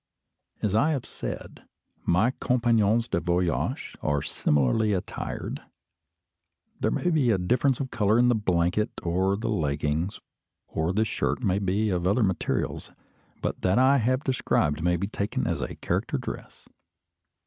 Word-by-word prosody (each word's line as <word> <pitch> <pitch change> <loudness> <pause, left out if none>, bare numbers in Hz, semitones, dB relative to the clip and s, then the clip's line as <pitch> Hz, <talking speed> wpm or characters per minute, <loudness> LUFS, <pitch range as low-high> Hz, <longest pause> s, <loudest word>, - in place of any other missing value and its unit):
As 105 -3 +1
I 145 +9 +3
have 135 - -3
said, - - -7 0.5
my 100 +8 +3
compagnons 115 -3 +2
de 85 - 0
voyage 85 0 -1
are 70 -1 0
similarly 75 - +1
attired. 90 - -4 1.2
There - - +1
may 175 - 0
be 145 -7 +3
a 110 - +4
difference 125 +8 +1
of 130 -2 -3
colour 105 0 +2
in 125 +1 +5
the 120 - +4
blanket 95 -1 +1
or 95 +3 +1
the 115 - -2
leggings, 75 0 -1 0.5
or 80 +2 -1
the 110 +4 +1
shirt 110 - -1
may 95 -2 +2
be 100 +2 0
of 90 -1 0
other 105 +5 +3
materials; 95 -3 -1 0.5
but - - -2
that 95 +3 +2
I 135 +2 +5
have 130 +4 +1
described 80 - +1
may 90 +1 +2
be 95 - -2
taken 100 0 -2
as - - -1
a - - -4
character - - -1
dress. - - -8
100 Hz, 150 wpm, -26 LUFS, 90-120 Hz, 1.2 s, in